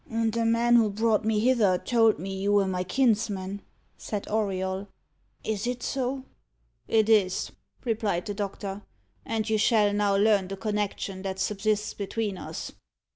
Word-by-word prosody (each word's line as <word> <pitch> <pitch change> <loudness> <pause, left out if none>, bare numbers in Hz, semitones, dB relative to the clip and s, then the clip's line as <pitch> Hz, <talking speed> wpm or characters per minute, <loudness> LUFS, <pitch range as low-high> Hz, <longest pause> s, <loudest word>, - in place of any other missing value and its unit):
"The 230 0 0
man 235 +1 +4
who 225 -2 +4
brought 215 +1 +1
me 220 -1 +2
hither 225 -7 +3
told 225 0 +3
me 195 +1 -5
you 200 +2 0
were 200 -1 +4
my 180 -1 -1
kinsman," 205 -3 0 0.4
said 210 -2 -4
Auriol. 195 -2 -1 0.6
"Is 220 +1 -2
it 245 0 -3
so?" 265 0 -2 0.6
"It 220 -1 +3
is," 200 -4 +2 0.3
replied 215 -6 0
the 205 - -3
doctor, 200 0 -4 0.5
"and 220 -1 -1
you 220 -1 +1
shall 210 -1 +3
now 205 -1 +2
learn 200 -2 +3
the 195 +1 -6
connection 205 -2 -2
that 190 -1 -4
subsists 210 +2 0
between 205 -1 -3
us. - - -6
210 Hz, 150 wpm, -27 LUFS, 195-225 Hz, 0.6 s, man